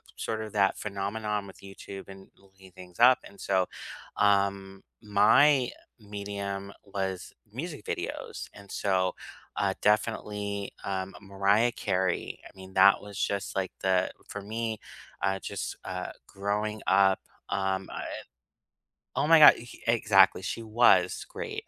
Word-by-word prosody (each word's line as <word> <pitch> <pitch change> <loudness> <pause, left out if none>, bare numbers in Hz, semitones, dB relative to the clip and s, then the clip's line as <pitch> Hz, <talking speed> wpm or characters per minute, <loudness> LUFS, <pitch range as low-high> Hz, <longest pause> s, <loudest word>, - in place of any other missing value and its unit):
sort 110 -1 -3
of 110 -1 -7
that 100 -2 +2
phenomenon 105 0 -3
with 95 - -13
YouTube 95 0 -10
and 95 0 -12
looking 95 -1 -19
things 90 +1 -14
up, 125 +2 +7
and 100 - -15
so, 95 -2 +1 0.5
um, 100 -1 +1 0.2
my 120 +6 +5 0.3
medium 100 -1 -5
was 95 -2 -4 0.2
music 145 +2 -6
videos. - - -5
And 100 -1 -13
so, 95 -2 +1 0.4
uh, 95 -1 +1
definitely, 105 -2 0
um, 95 0 -3
Mariah 100 +4 +2
Carey. 95 -5 -1
I - - -15
mean, 95 0 -12
that 100 +1 +6
was 100 -1 -10
just 100 -1 -2
like 95 -1 -1
the 95 -1 +2 0.2
for 100 - -6
me, 110 +1 -3 0.4
uh, 95 0 +1
just, - - -5
uh, - - -5 0.2
growing 105 +2 -2
up, 95 0 +4 0.3
um, 95 0 -1
I - - -5
eh - - -6 1.1
Oh - - +2
my 165 0 +7
god, 150 - +10 0.3
exactly 110 -5 +4
she 115 - -4
was 115 +2 +3
great. - - -6
100 Hz, 135 wpm, -28 LUFS, 95-105 Hz, 1.1 s, god